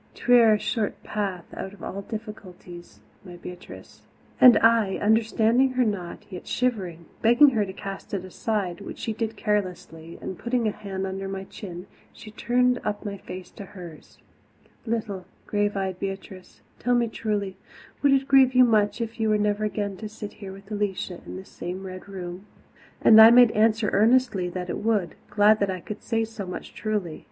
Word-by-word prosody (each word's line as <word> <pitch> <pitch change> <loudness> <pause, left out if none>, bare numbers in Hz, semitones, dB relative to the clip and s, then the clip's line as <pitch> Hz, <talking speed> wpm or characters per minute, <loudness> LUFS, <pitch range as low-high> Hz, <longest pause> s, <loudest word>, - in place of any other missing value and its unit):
'Twere 235 -3 +5
a - - 0
short 215 -1 -3
path 195 -4 -3
out 190 - -6
of 205 - -14
all 200 - -5
difficulties, 195 -5 -10 0.2
my 180 -3 -10
Beatrice." 180 +1 -11 0.4
And 250 -2 +9
I, 225 -4 +3
understanding 225 +4 +2
her 255 -1 +2
not, 190 -5 -4
yet 180 - -8
shivering, 190 -10 -2 0.2
begged 240 +5 +6
her 220 -4 +1
to - - -5
cast 195 0 -8
it 185 -1 -4
aside, 185 -2 -3
which - - -8
she 225 - -3
did 225 0 -3
carelessly 180 -6 -3
and, 185 - -7
putting 235 -1 0
a - - +1
hand 195 -2 -5
under 195 0 -4
my 195 0 -5
chin, 180 -2 -9 0.3
she 215 - -12
turned 250 +3 +1
up 210 +1 -3
my 200 -1 -4
face 185 -1 -9
to - - -10
hers. 180 -6 -12 0.7
"Little, 210 -5 -3 0.2
grave 205 -1 0
eyed 190 -2 -3
Beatrice, 195 -1 -7 0.2
tell 245 +1 +1
me 240 -1 +2
truly, 205 -4 -3 0.4
would 285 - +4
it 270 0 +2
grieve 265 -2 +5
you 255 - +8
much 215 -2 +2
if 230 0 -5
you 220 -1 +1
were 215 - +3
never 210 0 0
again 205 -2 -3
to 215 +1 -7
sit 210 -1 -8
here 195 -2 -9
with 195 +2 -13
Alicia 195 -3 -3
in - - -7
this 190 +1 -9
same 185 +2 -6
Red 185 +1 -9
Room?" 185 0 -7 0.6
And 220 0 +9
I 220 - +11
made 240 -1 +7
answer 215 0 +2
earnestly 220 -4 +3
that 180 0 -5
it - - -4
would, 210 -6 0 0.2
glad 210 +1 +4
that 200 - +1
I 185 -1 -3
could 210 +4 -8
say 225 -1 -1
so 220 -4 -8
much 180 - -7
truly. 205 -7 -3
205 Hz, 185 wpm, -25 LUFS, 190-225 Hz, 0.7 s, I